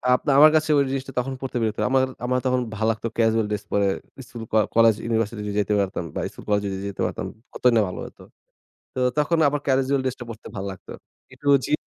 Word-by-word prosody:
আপনা 140 +3 -1
আমার 155 +1 +9
কাছে 155 0 +2
ঐ - - +5
জিনিসটা 135 0 -3
তখন 135 +2 -2
পড়তে 130 -2 -3
বিরক্ত 110 -1 -1
আমার 130 0 +4 0.2
আমার 125 +1 +1
তখন 125 0 +2
ভালো 110 +1 0
লাগতো 110 +1 -4
casual 110 -1 +3
ড্রেস 105 -1 -2
পরে 100 -1 +3 0.4
স্কুল, 120 -4 -8
ক - - +2 0.2
কলেজ, 115 -2 +6
ইউনিভার্সিটি 115 -1 -1
যদি 100 - -3
যেতে 105 +1 -1
পারতাম 95 -3 -2
বা, - - -1
স্কুল-কলেজ 105 -1 -1
যদি 95 -1 -3
যেতে 100 - -6
পারতাম, - - -3 0.3
কতই 125 - +3
না - - +5
ভালো - - -7
হতো! - - -13 0.7
তো 130 - -2 0.2
তখন 160 +3 +2
আবার 145 0 -1
casual 135 0 +2
ড্রেসটা 130 -1 -3
পরতে 115 -1 -9
ভাল 95 - -4
লাগতো। 95 - -13 0.4
একটু 145 - -5 0.2
জি - - -3
115 Hz, 210 wpm, -24 LUFS, 105-135 Hz, 0.7 s, আমার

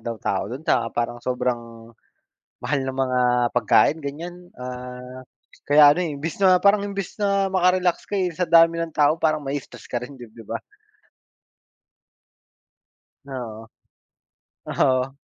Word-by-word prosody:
daw 115 - -4
tao 95 -2 -1
do'n. 135 +6 -7
Tsaka, 115 - +1
parang 120 0 -1
sobrang, 120 -2 -4 0.7
mahal 145 -2 -1
ng 130 0 -4
mga 130 -1 +1 0.4
pagkain, 125 +6 +4
ganyan, 175 +5 -8
ah, 125 0 -8 0.4
kaya 145 0 +7
ano 180 +4 -1
eh, 155 - -3
imbis 150 +3 -5
na 185 -2 +5
parang, 200 +1 +4
imbis 200 -2 -5
na 200 -2 +1
maka-relax 180 -1 +1
ka, - - -19
eh, 180 - +1
sa 180 - +1
dami 165 0 +5
ng 165 -1 -3
tao, 150 +1 +3
parang 155 -1 +1
mai-stress 140 -1 -6
ka 120 -1 -3
rin, 130 +1 -12
'dib 120 -3 -11
'di 115 - -11
ba? - - -5 2.7
Oo, 115 -4 -7 1.0
oo. 130 +1 0
140 Hz, 140 wpm, -23 LUFS, 125-175 Hz, 2.7 s, kaya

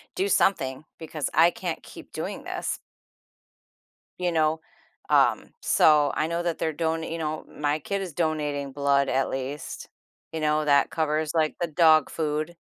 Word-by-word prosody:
Do 385 +2 0
something 135 - +1
because 155 -3 -4
I 165 +3 +6
can't - - -5
keep - - -13
doing - - -5
this." - - -4 1.4
You 180 -1 0
know? 160 -1 +2 0.5
Um, - - +3
so 150 -2 +4
I 155 - 0
know 170 +1 -2
that 170 -2 -1
they're 160 - -1
donat 160 +1 -2
you 165 - -3
know, 155 -1 -3
my 150 +1 -1
kid 200 +5 -3
is 180 -5 -5
donating 150 -4 -1
blood 140 0 +2
at 135 - +1
least. 135 +2 -5 0.4
You 160 - -4
know, 155 0 +1
that 140 -1 +3
covers, 155 -1 0
like, 155 -2 +1
the 175 - +1
dog 155 -1 +4
food. 155 +1 -2
155 Hz, 160 wpm, -26 LUFS, 145-165 Hz, 1.4 s, I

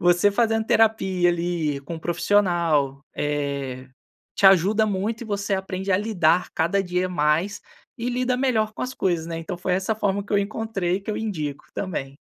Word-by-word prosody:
você 175 +3 +4
fazendo 225 +1 +1
terapia 190 -6 +3
ali, 170 -4 -1
com 145 +5 -7
um 160 - -6
profissional, 170 -6 +1
eh, 140 -3 -3 0.5
te 195 - +4
ajuda 195 +4 +5
muito 210 +3 -2
e - - -6
você 200 -1 -1
aprende 190 0 -2
a - - +5
lidar 185 -5 +2
cada 175 +4 +1
dia 180 0 -1
mais 165 +3 +1 0.4
e 235 0 -3
lida 250 0 0
melhor 235 -5 +1
com - - -6
as 255 0 -4
coisas, 170 -3 0
né. 165 -1 -4
Então 170 +2 -5
foi 180 +1 -1
essa 190 +4 0
a - - -2
forma 200 -2 -1
que 205 - -8
eu 205 - +4
encontrei 200 -3 -1
e - - -5
que 200 - -5
eu 210 - -2
indico 155 -10 -4
também. 140 -8 -4
185 Hz, 190 wpm, -24 LUFS, 165-210 Hz, 0.5 s, ajuda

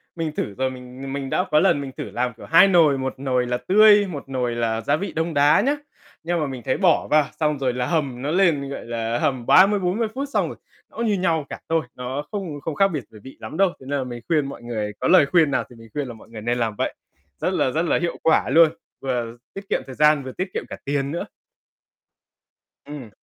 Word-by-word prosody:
Mình 165 -2 -2
thử 105 -8 -4
rồi 130 0 0
mình 130 +1 -8
mình 135 -1 -4
đã 180 - +1
có 150 - +5
lần 140 - +3
mình 135 -1 -6
thử - - -3
làm 125 0 -1
kiểu - - -11
2 165 +4 +6
nồi, 160 -7 +4
1 130 0 -3
nồi 125 -2 0
là 125 0 0
tươi, 205 +4 +5
1 145 -5 -7
nồi 125 -3 -1
là 115 -1 -1
gia - - +1
vị 195 +6 -4
đông 165 +1 -2
đá 145 +1 +5
nhá. 285 +3 +1 0.5
Nhưng 175 +1 -1
mà 150 - -1
mình 130 -2 -6
thấy 130 - 0
bỏ 185 -4 +3
vào 150 -1 +4
xong 150 -2 +1
rồi 130 -2 0
là 125 0 -1
hầm 140 -7 -1
nó 145 +3 -2
lên, 165 -7 +2
gọi 140 - -6
là, 115 0 -2
hầm 130 -6 -1
30-40 195 +3 +4
phút 275 +1 -3
xong - - +2
rồi - - -8 0.3
nó - - -18
như 225 -3 +1
nhau 165 -6 0
cả - - -7
thôi, 165 -1 +2
nó 130 +3 -4
không 175 -9 -5
không 155 +1 -4
khác 195 0 +4
biệt 150 -9 -4
về 110 - -13
vị 130 - -12
lắm 155 - -7
đâu. 195 -1 +4
Cho 130 - -14
nên 140 +1 -1
là 130 - -1
mình 120 -1 -7
khuyên 155 -4 +2
mọi 140 - -8
người 110 -3 -4
có - - 0
lời 175 -5 +6
khuyên 155 -1 +3
nào - - +1
thì 120 - -14
mình 115 0 -14
khuyên 145 -3 -3
là 120 - -7
mọi 110 - -16
người 110 -2 -9
nên 120 +2 -1
làm 110 -3 -1
vậy. - - -2 0.5
Rất - - 0
là, - - +1
rất 160 +5 0
là - - +2
hiệu 170 - -2
quả 160 - +3
luôn, 165 -1 +6 0.3
vừa 120 -3 -3 0.2
tiết 195 0 -9
kiệm - - 0
thời 130 -2 -9
gian 150 -2 +4
vừa 130 - -6
tiết 185 +6 -3
kiệm - - -3
cả - - -7
tiền 140 0 -1
nữa. 170 - -3 1.6
Ừm. 145 -6 -8
140 Hz, 255 wpm, -22 LUFS, 125-170 Hz, 1.6 s, 2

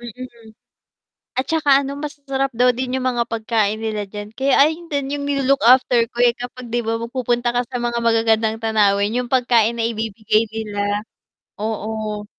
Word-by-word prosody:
Mm, 240 -1 -10 0.9
at 260 - 0
tsaka, 315 -3 +1
ano, 275 +1 -5
masasarap 280 -2 -3
daw 250 +2 +4
din 255 +1 -2
yung 255 - -3
mga 235 - +1
pagkain 220 -2 0
nila 215 -1 -2
diyan, 205 0 -7
kaya 270 0 +1
ayon 315 +4 +3
din 280 -1 -2
yung 285 - -4
nilo-look 275 -1 +1
after 250 -1 +5
ko, 240 - -13
eh, 240 -1 +4
kapag, 245 0 -8
'di 240 0 0
ba, 225 +1 -1
magpupunta 240 0 -1
ka 245 - +2
sa 250 0 -5
mga 235 0 -1
magagandang 225 -1 +2
tanawin 205 -1 +2
yung 245 -1 -3
pagkain 240 -3 +3
na 225 - +1
ibibigay 220 -1 0
nila, 205 -2 -2 0.6
oo. 215 -1 -3
235 Hz, 170 wpm, -20 LUFS, 220-260 Hz, 0.9 s, after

